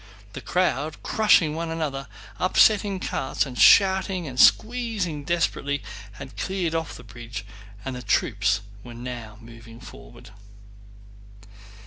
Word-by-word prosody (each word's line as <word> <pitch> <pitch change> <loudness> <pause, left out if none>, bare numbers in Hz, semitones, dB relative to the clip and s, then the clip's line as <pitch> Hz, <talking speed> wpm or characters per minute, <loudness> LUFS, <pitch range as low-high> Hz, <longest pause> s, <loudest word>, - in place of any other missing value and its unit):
The - - -7
crowd, 155 -4 -1
crushing 200 -8 +3
one 165 +1 -4
another, 150 -4 -3 0.3
upsetting 200 +1 +3
carts, 135 -4 -2
and 130 -3 -8
shouting 190 +2 +4
and 130 -2 -6
squeezing 215 - +2
desperately, 145 -4 -1 0.3
had 130 +5 -11
cleared 185 -4 -2
off 165 -1 -3
the - - -12
bridge 115 -1 -9 0.4
and 130 - -4
the 125 - -6
troops 105 -3 +1 0.2
were 120 -1 -10
now 120 -3 -8
moving 115 0 -13
forward. - - -14
145 Hz, 120 wpm, -24 LUFS, 120-185 Hz, 0.4 s, shouting